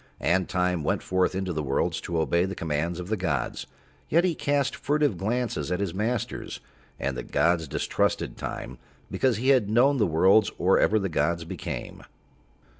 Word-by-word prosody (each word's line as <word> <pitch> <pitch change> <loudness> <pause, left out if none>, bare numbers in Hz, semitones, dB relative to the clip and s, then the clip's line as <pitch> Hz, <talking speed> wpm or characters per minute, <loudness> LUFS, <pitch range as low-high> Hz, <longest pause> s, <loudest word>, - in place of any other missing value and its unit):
And 95 +2 +1
Time 90 -3 0
went - - 0
forth 95 0 +1
into 95 -1 -2
the 80 - -2
worlds 70 -2 -1
to 85 -1 -2
obey 85 +2 +2
the 95 +1 -5
commands 80 +2 -2
of 90 +1 -6
the 110 - +1
gods, 80 -8 -2 0.4
yet 170 +3 +4
he 180 -2 +2
cast 145 -3 0
furtive 145 -5 +1
glances 105 - -2
at 90 - 0
his 100 -4 -2
masters, 110 +4 -3 0.4
and 70 -1 -2
the 60 - -3
gods 80 +4 +1
distrusted - - -1
Time 65 - -6 0.3
because 130 -5 +1
he 130 +4 0
had 125 -7 +4
known 130 +6 +4
the 105 -5 +2
worlds 95 +6 +4
or 95 +2 +3
ever 110 - +3
the 100 -2 0
gods 85 -1 0
became. - - -6
95 Hz, 180 wpm, -26 LUFS, 85-115 Hz, 0.4 s, yet